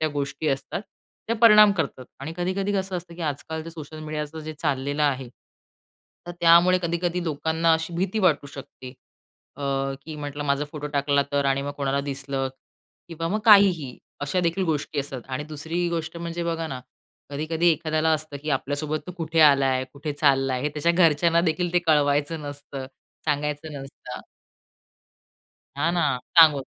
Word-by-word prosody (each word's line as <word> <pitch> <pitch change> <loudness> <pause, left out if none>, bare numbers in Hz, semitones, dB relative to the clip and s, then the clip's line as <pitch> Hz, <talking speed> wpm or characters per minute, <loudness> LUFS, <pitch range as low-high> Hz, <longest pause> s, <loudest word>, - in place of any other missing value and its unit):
त्या 155 - +1
गोष्टी 145 +1 -3
असतात, 135 +6 -2 0.5
त्या 230 - 0
परिणाम 215 -2 +8
करतात 150 -8 -3 0.2
आणि 155 +4 -5
कधी-कधी 190 +3 -1
कसं 190 -2 -1
असतं, 170 -1 -8
की 175 - -11
आजकाल 155 +1 -3
जेते 165 +1 -7
सोशल 155 -1 -9
मीडियाचं 155 +1 -5
जे 155 0 -6
चाललेलं 145 0 -1
आहे, 135 -3 0 1.0
तर 175 - -5
त्यामुळे 170 +2 +6
कधी-कधी 170 +1 -1
लोकांना 160 +2 +1
अशी 160 +1 -3
भीती 195 +4 -1
वाटू 155 -7 +2
शकते, 130 -2 -10 0.6
अ, 145 - -8 0.4
की 155 -1 -7
म्हटलं 145 0 -5
माझा 140 +1 +1
फोटो 150 -1 -5
टाकला 140 0 +2
तर 140 0 +1
आणि 135 0 +1
मग 145 - -4
कोणाला 140 0 0
दिसलं? 135 -1 -3 0.6
किंवा 165 0 -4
मग 215 +4 -1
काहीही. 190 - +5 0.2
अशा 145 +6 0
देखील 170 +2 0
गोष्टी 150 0 -4
असतात 135 -3 -6
आणि 130 +3 -3
दुसरी 160 +3 -3
गोष्ट 170 0 -3
म्हणजे 170 0 -4
बघा 165 -1 -2
ना, 130 -4 -6 0.5
कधी-कधी 160 +4 +1
एखाद्याला 155 0 0
असतं, 155 -2 -2
की 155 - -3
आपल्यासोबत 145 +3 -1
तो 180 - -6
कुठे 165 0 0
आलाय? 135 -3 +5
कुठे 145 +1 -5
चालला 135 -2 +2
आहे? 125 +1 -2
हे 150 - +1
त्याच्या 150 +3 0
घरच्यांना 170 -1 +4
देखील 175 +1 -2
ते 175 - +4
कळवायचं 145 +1 +2
नसतं, 145 -2 -7 0.4
सांगायचं 150 +1 -2
नसतं. 125 -2 -9 1.6
हां, 165 +4 +1
ना 175 -1 +1 0.4
सांगू. 150 -4 +8
155 Hz, 165 wpm, -25 LUFS, 140-170 Hz, 1.6 s, परिणाम